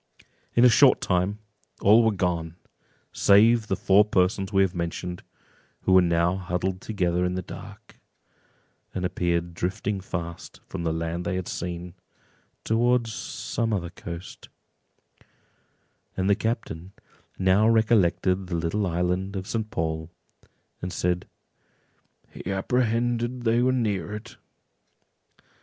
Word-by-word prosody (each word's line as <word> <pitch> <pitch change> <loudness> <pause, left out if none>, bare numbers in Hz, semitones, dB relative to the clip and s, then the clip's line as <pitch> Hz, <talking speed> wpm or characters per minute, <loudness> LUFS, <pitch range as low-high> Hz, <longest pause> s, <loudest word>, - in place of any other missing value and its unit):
In 120 - +6
a - - +10
short 115 - +6
time 90 +3 0 0.4
all 105 +4 +6
were 110 - +3
gone, 85 -4 -2 0.6
save 110 +3 +5
the 95 - 0
four 100 +2 +5
persons 95 -1 +1
we 95 -1 +4
have 95 -2 -1
mentioned, 90 0 -4 0.6
who - - 0
were 95 - +8
now 85 +1 +2
huddled 90 0 -2
together 90 -4 0
in 90 0 0
the 90 - -3
dark, - - -11 1.0
and 90 -1 -1
appeared 85 -1 -1
drifting 95 +3 -2
fast 85 -3 -6
from 95 - -6
the 85 -1 0
land 85 +2 -3
they 90 - -2
had 95 -1 -3
seen, 85 0 -5 0.7
towards 120 0 +1
some 115 +1 -3
other 90 -5 -2
coast; 85 +1 -9 1.7
and 95 0 0
the 100 - +5
captain 100 -5 -3 0.4
now 95 +3 +4
recollected 95 -4 +2
the 90 - -3
little 85 +5 -1
island 90 +3 -1
of 95 -1 -4
St. 110 0 -3
Paul, 80 -2 -3 0.7
and 90 - -4
said—"He 90 +1 -7
apprehended 120 +3 0
they 115 +1 +3
were 130 +1 +3
near 105 -7 -1
it." 120 +4 -10
95 Hz, 125 wpm, -25 LUFS, 90-110 Hz, 1.7 s, a